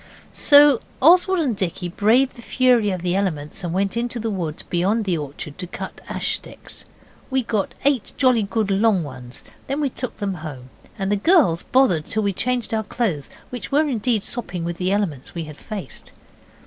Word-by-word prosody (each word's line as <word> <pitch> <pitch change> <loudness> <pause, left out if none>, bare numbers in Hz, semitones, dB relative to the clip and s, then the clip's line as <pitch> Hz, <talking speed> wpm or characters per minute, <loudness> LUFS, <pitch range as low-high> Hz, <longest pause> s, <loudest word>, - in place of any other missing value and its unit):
So 285 -3 +6 0.2
Oswald 355 +5 +5
and 260 -8 0
Dicky 185 -1 -2
braved 225 +9 +2
the 235 - -12
fury 245 -3 +3
of 185 -3 -3
the 180 0 0
elements 175 -4 -2
and 175 - -2
went 195 +3 0
into 240 0 -2
the 225 0 -2
wood 165 -6 -4
beyond 200 +6 +1
the 185 -3 +1
orchard 145 0 -7
to 180 - -4
cut - - -7
ash - - -1
sticks. - - -8 0.4
We 265 -1 +1
got 215 -4 -2
eight 275 -6 +1
jolly 255 -4 +4
good 205 0 -1
long 195 -2 +3
ones. 130 -3 -9 0.2
Then 275 +2 -2
we 285 -3 0
took 255 0 -5
them 200 -2 -2
home, 130 -5 -8 0.3
and 195 -1 -2
the 205 - +2
girls 225 - +4
bothered 230 - +2
till 220 -1 -1
we 200 -1 0
changed 250 +3 -1
our 220 0 0
clothes, 195 - -2 0.2
which 240 -7 -6
were 300 +2 +3
indeed 230 -4 0
sopping 185 -8 -2
with 170 0 -4
the 185 +1 0
elements 180 -11 -2
we 170 - -3
had 155 -1 -10
faced. 215 -3 -8
205 Hz, 190 wpm, -22 LUFS, 175-245 Hz, 0.4 s, So